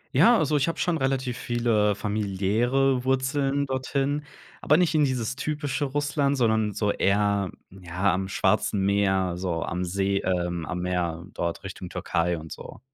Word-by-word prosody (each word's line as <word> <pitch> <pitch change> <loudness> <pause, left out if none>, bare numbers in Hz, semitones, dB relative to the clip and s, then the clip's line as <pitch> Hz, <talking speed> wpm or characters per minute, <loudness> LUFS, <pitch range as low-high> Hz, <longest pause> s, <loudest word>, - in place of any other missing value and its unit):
Ja, 235 0 +6
also, 150 -3 +1
ich 140 - +1
habe 165 - -2
schon 175 -2 0
relativ 130 -3 -1
viele 115 -4 +1
familiäre 110 +6 0
Wurzeln 135 +1 +1
dorthin, 140 +2 -1 0.3
aber 150 - +3
nicht 175 0 +3
in 150 -2 +4
dieses 130 0 -2
typische 145 -1 -2
Russland, 145 0 0
sondern 110 -4 +1
so 105 0 0
eher, 100 -1 +1 0.2
ja, 95 +1 -1
am 95 +1 -2
Schwarzen 100 0 +1
Meer, 95 -3 +1
so 90 -3 -2
am 90 +1 -3
See, 100 +2 0
ähm, 90 -3 -1
am 90 +1 -4
Meer 85 -2 -2
dort 85 +2 -3
Richtung 95 -1 -7
Türkei 85 0 -1
und 80 0 -10
so. - - -9
105 Hz, 160 wpm, -26 LUFS, 95-135 Hz, 0.3 s, Ja